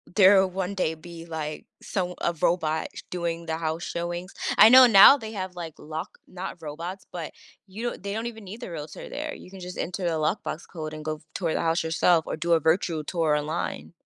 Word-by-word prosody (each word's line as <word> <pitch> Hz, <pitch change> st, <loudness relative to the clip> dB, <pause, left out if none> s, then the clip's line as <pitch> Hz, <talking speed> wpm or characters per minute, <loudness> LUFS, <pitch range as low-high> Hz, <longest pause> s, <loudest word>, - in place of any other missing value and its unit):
there 195 Hz, -1 st, +7 dB
will 190 Hz, -, 0 dB
one 190 Hz, +1 st, -3 dB
day 185 Hz, -5 st, 0 dB
be, 165 Hz, +1 st, -11 dB
like, 155 Hz, -2 st, -5 dB, 0.2 s
some 180 Hz, -3 st, -2 dB
a 170 Hz, -, +1 dB
robot 160 Hz, -2 st, +1 dB
sh -, -, -7 dB
doing 170 Hz, -1 st, -3 dB
the 160 Hz, -1 st, -2 dB
house 160 Hz, +1 st, -3 dB
showings? 175 Hz, +2 st, -4 dB, 0.2 s
I 215 Hz, -, +10 dB
know 255 Hz, +1 st, +10 dB
now 215 Hz, +6 st, +9 dB
they 220 Hz, -4 st, -8 dB
have, 185 Hz, -3 st, -5 dB
like, 165 Hz, -3 st, -6 dB
lock 155 Hz, +1 st, -7 dB
not 185 Hz, +1 st, -7 dB
robots, 170 Hz, +5 st, -6 dB
but 170 Hz, -3 st, -6 dB, 0.3 s
you 200 Hz, +5 st, -8 dB
don't 240 Hz, -, -3 dB
They 200 Hz, +1 st, -4 dB
don't 225 Hz, +2 st, -3 dB
even 225 Hz, -3 st, -7 dB
need 215 Hz, +6 st, -9 dB
the 185 Hz, -, -6 dB
realtor 150 Hz, -2 st, -7 dB
there, 300 Hz, +1 st, -4 dB
you 180 Hz, -, -13 dB
can 195 Hz, -, -10 dB
just 180 Hz, 0 st, -8 dB
enter 180 Hz, +2 st, -3 dB
a -, -, +2 dB
lockbox 155 Hz, +1 st, -2 dB
code 155 Hz, -2 st, -6 dB
and 155 Hz, 0 st, -8 dB
go 155 Hz, 0 st, -2 dB
f -, -, -23 dB
tour 165 Hz, -4 st, -1 dB
the -, -, 0 dB
house 165 Hz, 0 st, +1 dB
yourself 165 Hz, +1 st, +3 dB
or -, -, -3 dB
do 170 Hz, +2 st, +1 dB
a 165 Hz, -, +5 dB
virtual 160 Hz, 0 st, +1 dB
tour 160 Hz, -1 st, +1 dB
online. 155 Hz, +4 st, -3 dB
175 Hz, 225 wpm, -26 LUFS, 160-190 Hz, 0.3 s, I